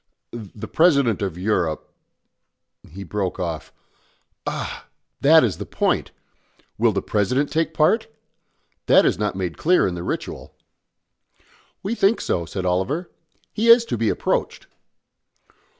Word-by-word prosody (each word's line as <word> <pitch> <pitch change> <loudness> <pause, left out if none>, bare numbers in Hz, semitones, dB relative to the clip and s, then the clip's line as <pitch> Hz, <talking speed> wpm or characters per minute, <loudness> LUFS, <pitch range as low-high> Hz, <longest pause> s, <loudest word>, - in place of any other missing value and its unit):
"The 110 -3 -8
President 140 - +3
of 95 -4 -3
Europe 90 -5 -1 0.5
" - - -27
He 100 - -6
broke 95 0 -3
off. 85 -4 -4 0.8
"Ah! - - -5 0.3
that 160 +3 +6
is 110 -7 -1
the - - -5
point. - - 0 0.7
Will 115 0 +4
the 100 -1 -2
President 125 +8 0
take 160 0 0
part? 160 +9 +2 0.8
That - - +6
is - - +1
not 105 -2 -1
made 90 -3 -4
clear 180 +3 +3
in 90 - -3
the 85 - -5
ritual." - - -5 1.3
"We 200 +4 -2
think 220 -1 +2
so," 85 -2 -2
said 95 +1 -4
Oliver. 105 - -1 0.4
"He 225 +2 0
is 235 0 +7
to - - -2
be 115 -1 0
approached." - - -2
110 Hz, 135 wpm, -22 LUFS, -, 1.3 s, is